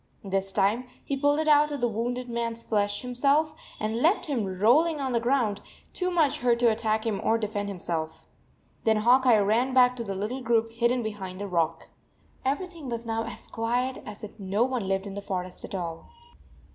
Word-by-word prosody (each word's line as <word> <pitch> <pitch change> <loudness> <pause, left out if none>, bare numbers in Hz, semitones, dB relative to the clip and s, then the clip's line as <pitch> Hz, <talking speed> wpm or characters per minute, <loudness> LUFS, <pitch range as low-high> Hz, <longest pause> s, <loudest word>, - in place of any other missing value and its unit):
This 195 0 -1
time 210 +7 +1 0.2
he 280 - -1
pulled 290 +1 +2
it 315 0 0
out 300 0 +5
of 290 - -3
the 240 - +2
wounded 245 +3 -2
man 235 -1 -2
s 230 0 -10
flesh 205 0 0
himself, 280 +5 +2 0.3
and 220 +2 -2
left 345 +8 +3
him 265 - -1
rolling 295 - +4
on 265 -2 -1
the 235 - +2
ground, 235 -4 +1 0.3
too 365 0 0
much 325 -6 +2
hurt 240 -1 +3
to 235 -2 +5
attack 220 0 0
him 215 -3 -1
or 225 - +3
defend 205 -2 -3
himself. 165 -4 -4 0.6
Then 220 -1 +3
Hawk 250 +4 +4
Eye 235 -3 +7
ran 225 +6 +2
back 250 -1 +6
to 235 - -3
the 195 -3 -4
little 215 +7 -3
group 230 -1 +1
hidden 235 +1 +1
behind 195 -4 -5
the 205 - -4
rock. 165 -3 -1 0.5
Everything 315 +1 -3
was 235 0 -4
now 225 0 -1
as 230 - -7
quiet 245 +3 -1
as 210 +1 -10
if 215 +1 -9
no 200 +3 +1
one 250 -5 -1
lived 195 +1 0
in 200 - -6
the 200 - -5
forest 185 -2 -4
at - - -6
all. 165 -3 -5
230 Hz, 205 wpm, -27 LUFS, 205-255 Hz, 0.6 s, Eye